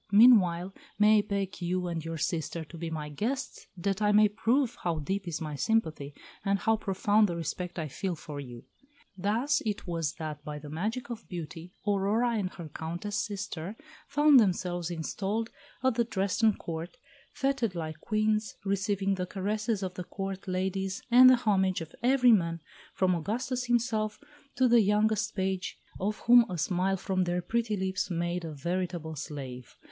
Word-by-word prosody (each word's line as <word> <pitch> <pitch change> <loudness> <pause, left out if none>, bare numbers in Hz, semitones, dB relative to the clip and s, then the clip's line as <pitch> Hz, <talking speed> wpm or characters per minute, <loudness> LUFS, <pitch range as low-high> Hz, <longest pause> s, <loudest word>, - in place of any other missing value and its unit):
Meanwhile, 195 -5 +6 0.2
may 210 +1 +6
I - - +4
beg 200 -2 -3
you 180 +1 -1
and 170 -2 -3
your 165 0 -4
sister 160 +1 -2
to 160 - -13
be 165 0 -4
my 155 -2 -4
guests, 230 - -3
that 195 +3 -1
I 210 0 +4
may 210 0 +6
prove 235 +4 +1
how 170 -2 0
deep 190 +6 -3
is 165 -2 -3
my 155 -2 -4
sympathy, 155 -7 0 0.3
and 200 0 +2
how 220 +4 +2
profound 205 0 +2
the 170 - -2
respect 170 +2 -4
I 160 -2 -2
feel 180 +5 -3
for 150 -2 -8
you." 120 -4 -9 0.5
Thus 220 +10 +1
it 210 -2 -3
was 165 -4 -2
that 155 -2 -6
by 150 -1 -5
the 150 0 -9
magic 220 +10 -3
of 230 -1 -7
beauty 170 0 -7
Aurora 205 +4 +2
and 205 -5 -1
her 170 -3 -7
Countess 170 +7 -5
sister 200 -3 -5 0.3
found 295 -1 +6
themselves 180 -4 0
installed 195 +7 -2 0.3
at 260 -1 +3
the 235 +1 +2
Dresden 210 0 +1
Court, 165 +7 -6 0.3
feted 270 -8 0
like 155 -2 -4
Queens, 215 +2 0
receiving 195 0 0
the 180 -1 -2
caresses 210 +2 -1
of 185 -1 -3
the 180 - -5
Court 195 +1 -5
ladies, 190 +1 -2
and 255 +1 +9
the 255 - +8
homage 190 -6 +1
of 160 -1 -8
every 250 0 +5
man, 170 -6 +2 0.4
from 185 -1 +3
Augustus 240 +8 -2
himself 225 -3 0 0.4
to 260 - +4
the 235 -1 +6
youngest 210 +1 +2
page, 190 -1 -2 0.2
of 210 +3 -1
whom 240 0 +7
a 180 - -3
smile 185 +4 +1
from 185 -1 0
their 175 0 -1
pretty 225 +2 0
lips 190 0 -1
made 175 0 -1
a 165 - -5
veritable 170 +1 -3
slave. 135 -4 -7
190 Hz, 170 wpm, -29 LUFS, 170-215 Hz, 0.5 s, and